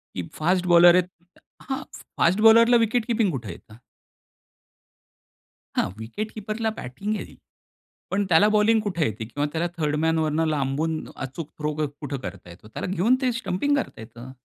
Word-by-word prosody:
की 90 Hz, -, -3 dB
fast 180 Hz, +3 st, 0 dB
bowler 175 Hz, +1 st, +8 dB
आहेत 180 Hz, 0 st, +2 dB, 0.5 s
हां, 270 Hz, +2 st, -4 dB, 0.3 s
फास्ट 185 Hz, +5 st, +3 dB
बॉलरला 230 Hz, +2 st, +7 dB
विकेट 225 Hz, +1 st, -1 dB
कीपिंग 225 Hz, -6 st, +1 dB
कुठे 120 Hz, -7 st, -5 dB
येत? 105 Hz, +5 st, -14 dB, 2.0 s
हां, -, -, +1 dB
विकेट 210 Hz, -, -5 dB
कीपरला 215 Hz, +1 st, -3 dB
बॅटिंग 195 Hz, -, -4 dB
येईल. -, -, -8 dB, 0.8 s
पण 200 Hz, +1 st, +1 dB
त्याला 170 Hz, +5 st, +5 dB
बॉलिंग 215 Hz, +1 st, +3 dB
कुठे 180 Hz, -7 st, -1 dB
येते 110 Hz, +1 st, -4 dB
किंवा 145 Hz, +6 st, -3 dB
त्याला 170 Hz, +2 st, 0 dB
थर्ड 150 Hz, -2 st, 0 dB
मन 160 Hz, 0 st, +2 dB
वरनं 160 Hz, +1 st, +1 dB
लांबून 155 Hz, +2 st, -1 dB, 0.2 s
अचूक 135 Hz, +4 st, -6 dB
थ्रो 150 Hz, 0 st, -1 dB
कुठं 145 Hz, -1 st, -6 dB
करता 90 Hz, -6 st, -9 dB
येतो. 90 Hz, +5 st, -14 dB
त्याला 110 Hz, -, -6 dB
घेऊन 190 Hz, +7 st, +2 dB
ते 255 Hz, -2 st, +2 dB
स्टंपिंग 235 Hz, +4 st, 0 dB
करता 275 Hz, -, -4 dB
येतं. 120 Hz, +3 st, -11 dB
170 Hz, 160 wpm, -24 LUFS, 140-215 Hz, 2.0 s, bowler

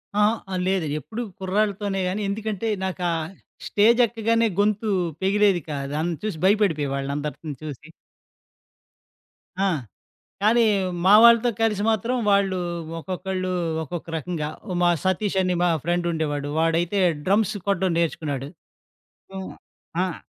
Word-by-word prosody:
అహా! 210 Hz, -2 st, +1 dB
లేదు, 190 Hz, -3 st, +1 dB
ఎప్పుడూ 215 Hz, -, -6 dB, 0.2 s
కుర్రాళ్లతోనే 200 Hz, 0 st, 0 dB
గానీ. 190 Hz, +3 st, -2 dB
ఎందుకంటే 215 Hz, +1 st, -3 dB, 0.2 s
నాకు 185 Hz, -1 st, -4 dB
ఆ -, -, 0 dB, 0.5 s
స్టేజ్ 225 Hz, +4 st, +4 dB
ఎక్కగానే 230 Hz, 0 st, +1 dB
గొంతు 210 Hz, +1 st, +1 dB, 0.3 s
పెగిలేది 195 Hz, -1 st, +3 dB
కాదు. 140 Hz, -1 st, -4 dB
అన్ 175 Hz, +2 st, -1 dB
చూసి 210 Hz, -7 st, -3 dB
భయపడిపోయేవాళ్లు 150 Hz, -9 st, +1 dB
అందరినీ 150 Hz, +1 st, -5 dB
చూసి. 150 Hz, 0 st, -8 dB, 1.8 s
ఆ! -, -, +3 dB, 0.8 s
కానీ 230 Hz, +2 st, +5 dB, 0.4 s
మా 195 Hz, -, +7 dB
వాళ్లతో 235 Hz, +1 st, +7 dB
కలిసి 210 Hz, -3 st, +1 dB
మాత్రం 225 Hz, +3 st, 0 dB
వాళ్లు 200 Hz, -2 st, +3 dB, 0.4 s
ఒక్కొక్కళ్లు 185 Hz, +1 st, -3 dB, 0.3 s
ఒక్కొక్క 170 Hz, +3 st, -6 dB
రకంగా, 160 Hz, -1 st, -3 dB, 0.3 s
మా 175 Hz, -, +5 dB
సతీష్ 190 Hz, +1 st, 0 dB
అని 185 Hz, -1 st, +1 dB
మా 175 Hz, -, +3 dB
ఫ్రెండ్ 175 Hz, +1 st, 0 dB
ఉండేవాడు. 145 Hz, -3 st, -2 dB
వాడైతే 165 Hz, +4 st, +1 dB, 0.3 s
డ్రమ్స్ 200 Hz, +1 st, +2 dB
కొట్టడం 190 Hz, -2 st, +1 dB
నేర్చుకున్నాడు. 155 Hz, -5 st, -1 dB, 0.9 s
ఆహ్, 190 Hz, 0 st, -5 dB, 0.5 s
ఆహ్, 185 Hz, -3 st, -2 dB
190 Hz, 120 wpm, -24 LUFS, 165-210 Hz, 1.8 s, మా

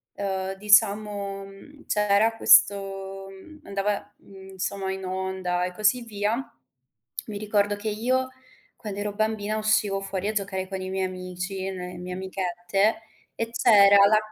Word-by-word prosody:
ehm, 190 Hz, -1 st, -3 dB
diciamo, 205 Hz, -1 st, +2 dB
mhmm, 240 Hz, +10 st, -15 dB
c'era 210 Hz, +2 st, +2 dB
questo, 195 Hz, -2 st, +3 dB
mhmm, 305 Hz, +12 st, -14 dB
andava, 200 Hz, +1 st, -2 dB
mhmm, 190 Hz, -1 st, -14 dB
insomma 190 Hz, 0 st, -3 dB
in 190 Hz, 0 st, -5 dB
onda 185 Hz, -1 st, -2 dB
e 180 Hz, -, -5 dB
così 215 Hz, +5 st, +2 dB
via, 210 Hz, -1 st, -1 dB, 0.9 s
mi 210 Hz, -2 st, -5 dB
ricordo 205 Hz, 0 st, 0 dB
che 210 Hz, +2 st, -3 dB
io 255 Hz, +5 st, 0 dB, 0.5 s
quando 205 Hz, -2 st, -7 dB
ero 205 Hz, 0 st, -3 dB
bambina 215 Hz, 0 st, -1 dB
uscivo 215 Hz, -2 st, +1 dB
fuori 195 Hz, 0 st, -4 dB
a -, -, +1 dB
giocare 195 Hz, -2 st, -3 dB
con 190 Hz, 0 st, -5 dB
i 185 Hz, -, -5 dB
miei 190 Hz, 0 st, -1 dB
amici, 185 Hz, +1 st, -5 dB
e 195 Hz, -, -3 dB
ne 180 Hz, -1 st, -6 dB
le -, -, -9 dB
mie 180 Hz, 0 st, -6 dB
amichette 190 Hz, +3 st, -1 dB, 0.3 s
e 230 Hz, 0 st, -3 dB
c'era 205 Hz, -4 st, +6 dB
la 215 Hz, +1 st, +5 dB
200 Hz, 155 wpm, -25 LUFS, 190-210 Hz, 0.9 s, c'era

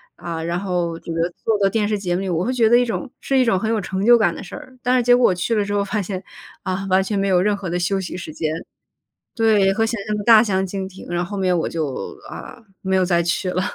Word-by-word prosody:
啊， 165 Hz, -1 st, -5 dB
然 170 Hz, +1 st, -2 dB
后 175 Hz, -3 st, -2 dB
这 170 Hz, -, -8 dB
个 165 Hz, +1 st, 0 dB, 0.2 s
做 225 Hz, -, +3 dB
的 195 Hz, -1 st, +3 dB
电 215 Hz, 0 st, 0 dB
视 210 Hz, -1 st, -1 dB
节 180 Hz, -3 st, -1 dB
目 185 Hz, -, -1 dB
里， 195 Hz, -, -3 dB
我 170 Hz, 0 st, 0 dB
会 245 Hz, -, -1 dB
觉 235 Hz, -3 st, +3 dB
得 235 Hz, -, +5 dB
一 245 Hz, -, +4 dB
种 245 Hz, +3 st, -4 dB
是 270 Hz, -, 0 dB
一 255 Hz, -, +4 dB
种 195 Hz, -5 st, +2 dB
很 220 Hz, -, -2 dB
有 225 Hz, -1 st, +1 dB
成 190 Hz, 0 st, -3 dB
就 240 Hz, +1 st, +7 dB
感 220 Hz, -, +2 dB
的 -, -, -7 dB
事 -, -, -9 dB
儿。 260 Hz, -, -11 dB
但 250 Hz, +1 st, +2 dB
是 245 Hz, -, +2 dB
结 245 Hz, +1 st, +6 dB
果 245 Hz, 0 st, +4 dB
我 185 Hz, -, +1 dB
去 180 Hz, +6 st, -1 dB
了 210 Hz, -2 st, +2 dB
之 200 Hz, -, -5 dB
后 200 Hz, 0 st, +1 dB
发 210 Hz, +1 st, -1 dB
现， 190 Hz, 0 st, -5 dB, 0.4 s
啊， 190 Hz, 0 st, -3 dB
完 190 Hz, +1 st, +4 dB
全 200 Hz, +2 st, -2 dB
没 195 Hz, 0 st, +1 dB
有 185 Hz, -2 st, +3 dB
任 205 Hz, +2 st, +2 dB
何 200 Hz, -3 st, -5 dB
的 175 Hz, -, -1 dB
休 195 Hz, +2 st, 0 dB
息 180 Hz, -, -6 dB
时 165 Hz, -3 st, -7 dB
间。 155 Hz, 0 st, -2 dB, 0.8 s
对， 215 Hz, -4 st, +3 dB
和 225 Hz, +3 st, +1 dB
想 225 Hz, -2 st, -3 dB
象 210 Hz, -, -1 dB
得 205 Hz, -, -4 dB
大 225 Hz, 0 st, +7 dB
相 190 Hz, -4 st, 0 dB
径 190 Hz, 0 st, -4 dB
庭， 190 Hz, -, -12 dB
然 175 Hz, 0 st, 0 dB
后 175 Hz, -, -8 dB
后 205 Hz, -, -4 dB
面 185 Hz, -2 st, +1 dB
我 165 Hz, -, -1 dB
就， 155 Hz, -5 st, -4 dB
啊， -, -, -9 dB, 0.2 s
没 190 Hz, 0 st, 0 dB
有 185 Hz, -1 st, +3 dB
再 175 Hz, -1 st, +2 dB
去 170 Hz, +2 st, -1 dB
了。 185 Hz, -, 0 dB
195 Hz, 320 characters per minute, -21 LUFS, 180-220 Hz, 0.8 s, 就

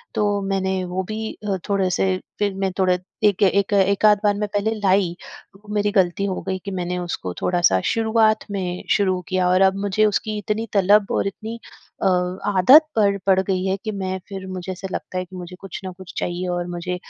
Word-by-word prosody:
तो 205 Hz, -1 st, +1 dB
मैंने 190 Hz, -1 st, -1 dB
वो 180 Hz, +1 st, -3 dB
भी 220 Hz, 0 st, -4 dB
अ, 200 Hz, -2 st, -3 dB
थोड़े 195 Hz, -2 st, +1 dB
से 185 Hz, +1 st, +1 dB, 0.2 s
फिर 205 Hz, -1 st, +1 dB
मैं 195 Hz, 0 st, -1 dB
थोड़ा 185 Hz, -1 st, +4 dB, 0.3 s
एक 205 Hz, -3 st, +3 dB
एक 200 Hz, +1 st, +2 dB
एकाध 200 Hz, +2 st, +4 dB
बार 205 Hz, -1 st, +4 dB
में 210 Hz, 0 st, -1 dB
पहले 205 Hz, +2 st, +1 dB
लाई, 190 Hz, -3 st, +2 dB, 0.4 s
वो 210 Hz, +1 st, -10 dB
मेरी 205 Hz, 0 st, +1 dB
गलती 190 Hz, -1 st, +1 dB
हो 190 Hz, -2 st, -2 dB
गई 190 Hz, 0 st, -1 dB
कि 200 Hz, -, -4 dB
मैंने 180 Hz, -1 st, -3 dB
उसको 175 Hz, -, -4 dB
थोड़ा-सा 175 Hz, -, +3 dB
शुरुआत 220 Hz, -1 st, +2 dB
में 180 Hz, -2 st, -3 dB
शुरू 190 Hz, -3 st, +2 dB
किया 185 Hz, -1 st, +1 dB
और 185 Hz, +1 st, +3 dB
अब 190 Hz, 0 st, +4 dB
मुझे 210 Hz, +2 st, +2 dB
उसकी 215 Hz, +1 st, -1 dB
इतनी 215 Hz, +2 st, -2 dB
तलब 200 Hz, +1 st, +4 dB
और -, -, +1 dB
इतनी 220 Hz, +4 st, -6 dB, 0.4 s
अ, -, -, +4 dB, 0.5 s
आदत 280 Hz, -, +8 dB
पड़ 200 Hz, -3 st, +3 dB
पड़ 190 Hz, -1 st, +4 dB
गई 190 Hz, -1 st, -1 dB
है 190 Hz, 0 st, +1 dB
कि 215 Hz, -, -2 dB
मैं 190 Hz, -2 st, -3 dB
फिर 195 Hz, -1 st, -6 dB
मुझे 185 Hz, 0 st, -5 dB
ऐसा 185 Hz, +1 st, -6 dB
लगता 185 Hz, -, -5 dB
है 185 Hz, -, -2 dB
कि 185 Hz, -, -13 dB
मुझे 180 Hz, 0 st, -8 dB
कुछ 195 Hz, -3 st, -7 dB
ना 185 Hz, -, -5 dB
कुछ 185 Hz, -2 st, -11 dB
चाहिए 175 Hz, +1 st, -2 dB
और 175 Hz, 0 st, -2 dB
मुझे 175 Hz, +1 st, -4 dB
195 Hz, 205 wpm, -22 LUFS, 185-205 Hz, 0.5 s, आदत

